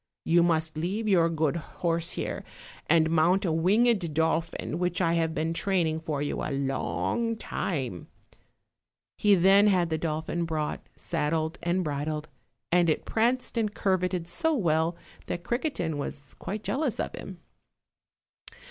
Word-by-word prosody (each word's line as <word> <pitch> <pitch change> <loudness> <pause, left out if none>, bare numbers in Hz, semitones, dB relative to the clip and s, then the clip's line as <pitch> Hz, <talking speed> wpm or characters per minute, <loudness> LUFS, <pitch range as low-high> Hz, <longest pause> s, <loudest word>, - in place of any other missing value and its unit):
You 170 +1 +4
must 160 -2 +2
leave 195 +7 -2
your 170 -5 +4
good 160 -1 0
horse 165 0 -2
here, - - -3 0.5
and 160 0 +4
mount 175 +5 +3
a 170 - +1
winged 185 0 +2
dolphin 160 0 0
which 180 -1 0
I 165 -3 +2
have 165 -1 0
been 160 +1 0
training 165 -3 +1
for 150 -3 -2
you 145 - -2
a - - -2
long 140 - -1
time;" 130 - -3 1.1
he 205 -1 +5
then 195 +3 +6
had 180 -4 +2
the 160 - 0
dolphin 160 +2 -2
brought, 155 -2 -2
saddled 160 +2 -1
and 175 +2 0
bridled, 150 +1 -3 0.4
and 175 -1 +4
it 155 - 0
pranced 235 +1 0
and 210 -2 -1
curveted 180 -3 0
so 320 - 0
well 165 - +1 0.3
that 175 - -4
Criquetin 235 - -2
was 140 -1 -6
quite 210 +1 -5
jealous 270 -5 -1
of - - -2
him. 185 -2 -8
170 Hz, 145 wpm, -28 LUFS, 160-190 Hz, 1.1 s, then